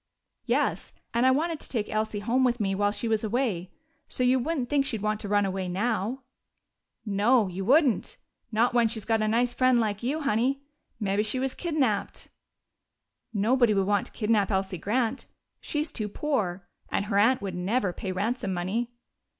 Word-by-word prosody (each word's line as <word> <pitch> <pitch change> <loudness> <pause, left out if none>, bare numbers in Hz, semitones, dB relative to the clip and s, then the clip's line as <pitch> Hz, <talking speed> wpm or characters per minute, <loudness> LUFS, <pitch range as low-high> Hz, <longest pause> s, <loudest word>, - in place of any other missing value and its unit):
"Yes, - - 0 0.2
and 235 +2 +3
I - - +7
wanted 315 +4 +1
to - - -6
take 220 -5 -1
Elsie 215 -1 -2
home 245 +5 +1
with 245 -1 +2
me 195 -2 0
while 205 +1 +2
she 225 +3 -3
was 220 -1 +1
away. 215 -6 -1 0.4
So 250 - -1
you 255 +1 +4
wouldn't 270 -1 -1
think 280 +1 +2
she'd 225 -6 -3
want 215 0 0
to 210 - -4
run 205 0 +2
away 190 -1 -2
now." 225 +6 -1 0.8
"No, 210 +2 +3
you 185 +1 -5
wouldn't. 270 - +3 0.3
Not 230 +3 +2
when 240 -1 +4
she's 220 -2 -4
got 225 -1 +1
a 215 - +1
nice 240 +3 +2
friend 255 0 +3
like 210 -3 -1
you, 280 +6 -1
Honey. 275 +1 0 0.4
Mebbe 205 -1 +1
she 215 +4 0
was 265 0 -1
kidnaped." 285 - -1 1.0
"Nobody 230 +1 +3
would 195 -1 +2
want 205 0 +1
to - - -15
kidnap 210 -3 +1
Elsie 190 -2 -1
Grant. 235 +6 -1 0.3
She's 300 +1 -2
too 215 -3 -3
poor 200 -9 -2 0.2
and 200 - -1
her 200 -1 +1
aunt 230 +2 +3
would 195 -2 -3
never 190 +2 0
pay 190 - -4
ransom 200 +1 -1
money." 200 +7 -2
220 Hz, 185 wpm, -27 LUFS, 200-255 Hz, 1.0 s, I